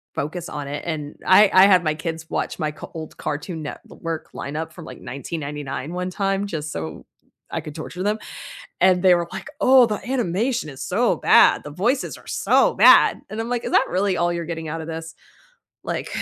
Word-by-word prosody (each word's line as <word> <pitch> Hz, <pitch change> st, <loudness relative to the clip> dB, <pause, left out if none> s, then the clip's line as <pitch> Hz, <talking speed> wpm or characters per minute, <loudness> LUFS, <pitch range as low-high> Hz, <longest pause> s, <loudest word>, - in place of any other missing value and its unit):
focus 170 Hz, +4 st, -4 dB
on 145 Hz, -1 st, -5 dB
it, 145 Hz, +1 st, -5 dB
and 150 Hz, -3 st, -5 dB
I 195 Hz, +2 st, +6 dB
I 185 Hz, +1 st, +8 dB
had 185 Hz, -3 st, +5 dB
my 155 Hz, -, +1 dB
kids 160 Hz, 0 st, -5 dB
watch -, -, -2 dB
my 155 Hz, -3 st, -1 dB
c 150 Hz, -, -10 dB
old 160 Hz, -1 st, -7 dB
Cartoon 160 Hz, +2 st, -4 dB
Network 160 Hz, +2 st, -7 dB
lineup 155 Hz, +3 st, -5 dB
from, 170 Hz, -3 st, -10 dB
like, -, -, -10 dB
1999 145 Hz, +2 st, -5 dB
one 180 Hz, +1 st, -3 dB
time 195 Hz, +1 st, -1 dB
just 155 Hz, -4 st, -4 dB
so 80 Hz, -1 st, -6 dB, 0.5 s
I -, -, -2 dB
could 150 Hz, -, -8 dB
torture 180 Hz, +3 st, -6 dB
them, 210 Hz, +2 st, 0 dB, 0.6 s
and 185 Hz, -1 st, +4 dB
they 185 Hz, -2 st, +6 dB
were, 170 Hz, 0 st, -2 dB
like, -, -, -7 dB
"Oh, 255 Hz, -2 st, +7 dB
the 210 Hz, -2 st, -2 dB
animation 235 Hz, -3 st, -1 dB
is 135 Hz, -, -9 dB
so 225 Hz, +6 st, +1 dB
bad, -, -, +5 dB
the 145 Hz, -, -7 dB
voices 245 Hz, -, -1 dB
are -, -, -18 dB
so -, -, +3 dB
bad." -, -, +6 dB
And 215 Hz, -, -5 dB
I'm, 225 Hz, -, -3 dB
like, 245 Hz, -1 st, -2 dB
"Is -, -, -4 dB
that -, -, +4 dB
really 190 Hz, 0 st, +1 dB
all 175 Hz, 0 st, +1 dB
you're 170 Hz, 0 st, -3 dB
getting 160 Hz, -1 st, -5 dB
out 165 Hz, +2 st, -4 dB
of 160 Hz, -, -7 dB
this?" 165 Hz, 0 st, -6 dB, 0.7 s
Like -, -, -3 dB
170 Hz, 205 wpm, -22 LUFS, 155-195 Hz, 0.7 s, I